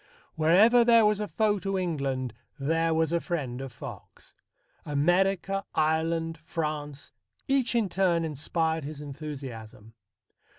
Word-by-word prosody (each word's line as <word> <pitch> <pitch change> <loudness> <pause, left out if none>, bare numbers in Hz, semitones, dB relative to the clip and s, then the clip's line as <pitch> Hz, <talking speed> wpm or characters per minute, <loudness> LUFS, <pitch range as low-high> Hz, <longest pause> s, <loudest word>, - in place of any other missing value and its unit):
Wherever 200 +10 +5
there 230 -2 +6
was 210 -1 +2
a 210 - -2
foe 210 -2 +1
to 195 0 -2
England, 140 - -2 0.2
there 165 +4 +1
was 160 0 +1
a 170 - +2
friend 135 -8 -3
of 135 -1 -6
Fox. - - -11 0.5
America, 190 +6 +1
Ireland, 160 +1 0
France, 150 -3 -4 0.4
each 265 -3 +1
in 225 -4 +2
turn 175 -3 +1
inspired 160 +1 -1
his 145 +1 -7
enthusiasm. 135 -7 -8
160 Hz, 125 wpm, -28 LUFS, 145-195 Hz, 0.5 s, there